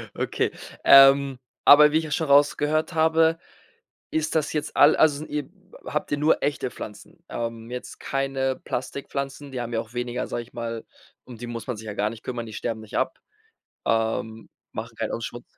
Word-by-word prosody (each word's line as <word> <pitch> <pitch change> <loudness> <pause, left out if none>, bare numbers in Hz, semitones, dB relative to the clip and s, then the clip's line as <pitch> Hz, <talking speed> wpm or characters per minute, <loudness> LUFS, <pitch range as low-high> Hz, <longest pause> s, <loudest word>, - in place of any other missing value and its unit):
Okay, - - -1 0.3
ähm, 135 -1 +7 0.3
aber 150 +1 +9
wie 155 - +3
ich 160 - 0
ja 155 - -7
schon 160 +1 0
rausgehört 150 +3 +3
habe, 160 0 +3 0.7
ist 160 0 -1
das 155 -1 0
jetzt 150 - -3
all 145 - +7
also 150 -3 +4
sind 155 - -8
ihr 145 -2 -3 0.4
habt 150 - -3
ihr 145 - +1
nur 150 +2 +2
echte 140 -3 -1
Pflanzen? 105 +10 -10
Ähm, 115 -1 -5
jetzt 125 - -7
keine 135 -1 -1
Plastikpflanzen, 140 +2 -5
die 125 - -4
haben 120 0 -5
ja 115 - +1
auch 115 +2 -14
weniger 120 0 -3
sage 120 - -3
ich 120 - -21
mal, 115 -1 -5 0.4
um 120 -3 -11
die 120 - -7
muss 120 0 -6
man 125 - -3
sich 110 - -10
ja 105 - -5
gar 105 +1 0
nicht 115 0 -10
kümmern, 120 -2 -4
die 110 - -10
sterben 110 +1 -3
nicht 110 - -6
ab, - - -1 0.7
ähm, 110 0 -1 0.2
machen - - -6
keinen - - -2
au - - -2
Schmut 120 +1 -6
135 Hz, 195 wpm, -25 LUFS, 115-150 Hz, 0.7 s, aber